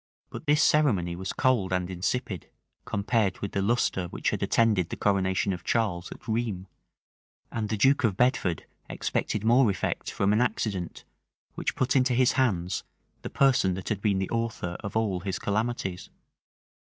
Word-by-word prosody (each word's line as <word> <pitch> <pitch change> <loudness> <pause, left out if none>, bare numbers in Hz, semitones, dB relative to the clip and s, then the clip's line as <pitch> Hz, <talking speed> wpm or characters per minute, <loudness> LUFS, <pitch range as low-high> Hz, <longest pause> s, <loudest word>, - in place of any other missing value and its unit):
But 160 - -8
this 150 +1 +4
ceremony 100 - +2
was 95 +2 -4
cold 120 -8 +1
and 90 -1 0
insipid, 95 - -3 0.4
compared 105 -2 0
with 100 - -5
the 100 - -1
lustre 100 -4 +1
which - - -2
had - - -3
attended 105 -7 +2
the - - -4
coronation 95 -1 +1
of 90 -1 -7
Charles 95 -7 -1
at - - -11
Rheims; 110 -5 -2 0.9
and 110 -2 -3
the 110 - -1
duke 135 +6 +4
of 105 -5 +1
Bedford 120 - +1 0.2
expected 105 - -2
more 120 +1 +5
effect 95 - -2
from 100 +1 +1
an 110 - +3
accident, 100 -7 -2 0.5
which - - -3
put 130 +1 0
into 130 -1 +3
his 125 0 +4
hands 95 -10 0 0.4
the - - -6
person 130 -9 +3
that 95 - -6
had 105 -3 -2
been 100 -2 +2
the 95 0 -2
author 115 -7 -2
of 100 +1 -4
all 105 -5 0
his 95 +1 -3
calamities. 105 -4 -2
105 Hz, 170 wpm, -27 LUFS, 95-120 Hz, 0.9 s, more